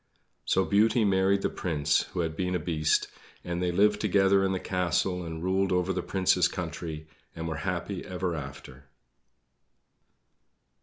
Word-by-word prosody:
So 95 Hz, -, +2 dB
Beauty 110 Hz, +2 st, +3 dB
married 95 Hz, 0 st, +2 dB
the -, -, +1 dB
Prince 75 Hz, -5 st, 0 dB
who -, -, -4 dB
had 80 Hz, -1 st, -2 dB
been 90 Hz, +1 st, -1 dB
a -, -, 0 dB
Beast, 80 Hz, -2 st, +1 dB, 0.4 s
and 85 Hz, 0 st, -3 dB
they 90 Hz, -1 st, +1 dB
lived 105 Hz, +3 st, +3 dB
together 100 Hz, -1 st, +3 dB
in 95 Hz, -, +1 dB
the 95 Hz, -, -1 dB
castle 90 Hz, 0 st, -1 dB
and 80 Hz, 0 st, -6 dB
ruled 95 Hz, +1 st, +1 dB
over 90 Hz, +1 st, +1 dB
the 90 Hz, -, -2 dB
Prince's 95 Hz, -1 st, +2 dB
country, 80 Hz, -2 st, -6 dB, 0.3 s
and 80 Hz, 0 st, -5 dB
were 80 Hz, -1 st, -3 dB
happy 90 Hz, +2 st, -3 dB
ever 90 Hz, -1 st, -3 dB
after. 65 Hz, -3 st, -8 dB
90 Hz, 155 wpm, -28 LUFS, 80-95 Hz, 0.4 s, Beauty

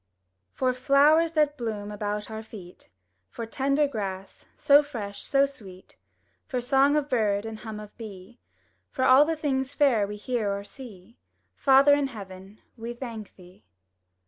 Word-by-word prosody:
For 255 Hz, -1 st, +1 dB
flowers 290 Hz, +6 st, +4 dB
that 300 Hz, -2 st, +1 dB
bloom 210 Hz, -3 st, -4 dB
about 210 Hz, +1 st, -4 dB
our 220 Hz, 0 st, -5 dB
feet; 195 Hz, -5 st, -13 dB, 0.4 s
For 230 Hz, -, -6 dB
tender 275 Hz, +5 st, +1 dB
grass, 195 Hz, -6 st, -6 dB
so 285 Hz, +1 st, +6 dB
fresh, 215 Hz, -9 st, -7 dB
so 275 Hz, 0 st, +2 dB
sweet; 195 Hz, -9 st, -13 dB, 0.5 s
For 255 Hz, -5 st, -2 dB
song 270 Hz, +4 st, +3 dB
of 295 Hz, -2 st, 0 dB
bird, 210 Hz, -5 st, 0 dB
and 220 Hz, -1 st, -7 dB
hum 215 Hz, -1 st, -7 dB
of 210 Hz, -1 st, -12 dB
bee; 210 Hz, +1 st, -10 dB, 0.5 s
For 260 Hz, -, -1 dB
all 290 Hz, +5 st, +5 dB
things 275 Hz, -3 st, -2 dB
fair 245 Hz, -9 st, +3 dB
we 210 Hz, -, -6 dB
hear 215 Hz, -1 st, -2 dB
or 200 Hz, 0 st, -4 dB
see. 220 Hz, -2 st, -13 dB, 0.4 s
Father 275 Hz, +1 st, +5 dB
in 285 Hz, -1 st, +2 dB
heaven, 195 Hz, -3 st, -11 dB
we 235 Hz, 0 st, -7 dB
thank 230 Hz, -5 st, -8 dB
Thee! 180 Hz, 0 st, -18 dB
235 Hz, 150 wpm, -26 LUFS, 205-275 Hz, 0.5 s, so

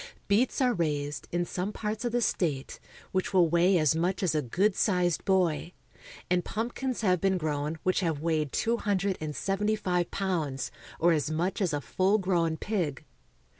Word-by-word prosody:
Beets 230 Hz, +7 st, +2 dB
are 250 Hz, -2 st, +3 dB
raised, 150 Hz, -5 st, -2 dB
in 175 Hz, 0 st, 0 dB
some 180 Hz, +4 st, -3 dB
parts 215 Hz, +1 st, -4 dB
of 240 Hz, -, -1 dB
the 240 Hz, +1 st, +1 dB
state, 145 Hz, -11 st, -1 dB, 0.3 s
which 190 Hz, +1 st, -1 dB
will 175 Hz, -2 st, +6 dB
weigh 175 Hz, +3 st, +4 dB
as 155 Hz, -3 st, +3 dB
much 180 Hz, +4 st, 0 dB
as 175 Hz, -, +2 dB
a 155 Hz, -, +1 dB
good 185 Hz, -, +1 dB
sized 180 Hz, -5 st, +1 dB
boy; 180 Hz, -3 st, +1 dB, 0.5 s
and 180 Hz, 0 st, +1 dB
pumpkins 240 Hz, +5 st, -3 dB
have 185 Hz, -5 st, +2 dB
been 195 Hz, -1 st, +2 dB
grown 150 Hz, -1 st, -2 dB
which 185 Hz, -, +2 dB
have 165 Hz, -5 st, -1 dB
weighed 155 Hz, -3 st, 0 dB
two 230 Hz, +1 st, +1 dB
hun 205 Hz, -3 st, 0 dB
dred 195 Hz, +1 st, 0 dB
and 150 Hz, -1 st, -4 dB
seventy 210 Hz, +2 st, 0 dB
five 180 Hz, -4 st, -1 dB
pounds, 160 Hz, -9 st, -2 dB, 0.3 s
or 170 Hz, +1 st, +4 dB
as 155 Hz, -2 st, +1 dB
much 175 Hz, +6 st, -1 dB
as 185 Hz, -4 st, +1 dB
a 145 Hz, -1 st, -1 dB
full 190 Hz, +8 st, +2 dB
grown 175 Hz, -5 st, +1 dB
pig. 175 Hz, -, -2 dB
180 Hz, 185 wpm, -29 LUFS, 160-195 Hz, 0.5 s, will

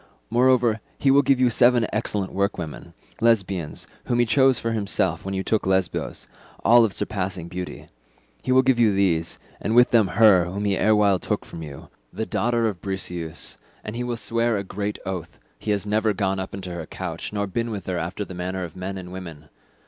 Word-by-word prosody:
Moreover 120 Hz, -2 st, +3 dB, 0.2 s
he 135 Hz, -, +3 dB
will 140 Hz, +1 st, +6 dB
give 135 Hz, -1 st, +2 dB
you 125 Hz, -1 st, +4 dB
seven 120 Hz, 0 st, +4 dB
excellent 105 Hz, -3 st, -2 dB
workwomen, 95 Hz, -6 st, -3 dB, 0.2 s
Lesbians, 100 Hz, -8 st, 0 dB, 0.2 s
whom 120 Hz, -, 0 dB
he 120 Hz, -, +4 dB
chose 130 Hz, +3 st, +4 dB
for 115 Hz, -, -2 dB
himself, 105 Hz, -3 st, -1 dB
when 95 Hz, 0 st, -4 dB
you 95 Hz, -, -1 dB
took 110 Hz, -2 st, 0 dB
Lesbos—all 95 Hz, +5 st, +1 dB
of 110 Hz, -, +1 dB
surpassing 95 Hz, -4 st, -3 dB
beauty. 90 Hz, +1 st, -7 dB, 0.5 s
He 130 Hz, -, -2 dB
will 130 Hz, 0 st, +5 dB
give 130 Hz, -2 st, +3 dB
you 110 Hz, -4 st, +4 dB
these, 85 Hz, -4 st, +1 dB, 0.2 s
and 110 Hz, -, 0 dB
with 125 Hz, +1 st, +6 dB
them 115 Hz, -4 st, +5 dB
her 95 Hz, -1 st, +5 dB
whom 100 Hz, +4 st, -4 dB
he 100 Hz, -1 st, +2 dB
erewhile 105 Hz, -2 st, +3 dB
took -, -, -2 dB
from 80 Hz, -, -9 dB
you, 75 Hz, -3 st, -9 dB, 0.2 s
the 110 Hz, -, -3 dB
daughter 115 Hz, 0 st, +1 dB
of 100 Hz, -5 st, -4 dB
Briseus, 90 Hz, -, -4 dB, 0.3 s
and 105 Hz, -, -6 dB
he 120 Hz, -, -2 dB
will 120 Hz, -1 st, -3 dB
swear 115 Hz, +1 st, +1 dB
a 100 Hz, -, -2 dB
great 100 Hz, +2 st, -4 dB
oath, 95 Hz, -4 st, -5 dB, 0.2 s
he -, -, -6 dB
has 105 Hz, -1 st, +1 dB
never 110 Hz, +1 st, +1 dB
gone 95 Hz, -1 st, -1 dB
up 95 Hz, 0 st, -5 dB
into 95 Hz, -2 st, -6 dB
her 85 Hz, -2 st, -6 dB
couch 85 Hz, -3 st, -5 dB
nor 100 Hz, -1 st, -1 dB
been 115 Hz, +5 st, -2 dB
with 105 Hz, -3 st, -5 dB
her 90 Hz, -2 st, -2 dB
after 90 Hz, +5 st, -4 dB
the 95 Hz, -, -9 dB
manner 90 Hz, +1 st, -3 dB
of 85 Hz, -3 st, -8 dB
men 95 Hz, +1 st, -5 dB
and 90 Hz, -1 st, -8 dB
women. 80 Hz, -5 st, -9 dB
100 Hz, 200 wpm, -24 LUFS, 95-115 Hz, 0.5 s, will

